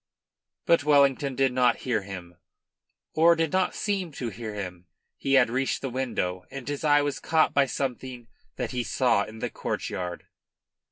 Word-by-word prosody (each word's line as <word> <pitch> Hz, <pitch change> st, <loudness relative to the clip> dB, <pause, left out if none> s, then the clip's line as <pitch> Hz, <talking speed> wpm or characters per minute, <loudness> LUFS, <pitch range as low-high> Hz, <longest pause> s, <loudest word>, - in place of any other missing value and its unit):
But 170 Hz, -3 st, +4 dB
Wellington 140 Hz, -2 st, +3 dB
did 135 Hz, -1 st, +2 dB
not 125 Hz, -2 st, +2 dB
hear 120 Hz, -5 st, +1 dB
him, 90 Hz, -3 st, -8 dB, 0.8 s
or 170 Hz, +2 st, +5 dB
did 165 Hz, -2 st, 0 dB
not 185 Hz, -1 st, +1 dB
seem 195 Hz, -5 st, -2 dB
to 125 Hz, -4 st, -4 dB
hear 110 Hz, +1 st, -7 dB
him. 90 Hz, -3 st, -6 dB, 0.3 s
He 135 Hz, -, -2 dB
had 125 Hz, -4 st, +5 dB
reached 130 Hz, +2 st, -1 dB
the 135 Hz, -, -3 dB
window 115 Hz, -8 st, -2 dB
and 135 Hz, -2 st, -8 dB
his 145 Hz, +2 st, -3 dB
eye 145 Hz, -1 st, +4 dB
was 145 Hz, -1 st, -2 dB
caught 160 Hz, -1 st, +2 dB
by 140 Hz, -1 st, +3 dB
something 125 Hz, -2 st, -4 dB, 0.3 s
that 125 Hz, -3 st, -3 dB
he 125 Hz, -1 st, -1 dB
saw 125 Hz, +1 st, +2 dB
in 110 Hz, +1 st, -11 dB
the -, -, -4 dB
courtyard. 90 Hz, -1 st, -4 dB
130 Hz, 170 wpm, -26 LUFS, 115-145 Hz, 0.8 s, or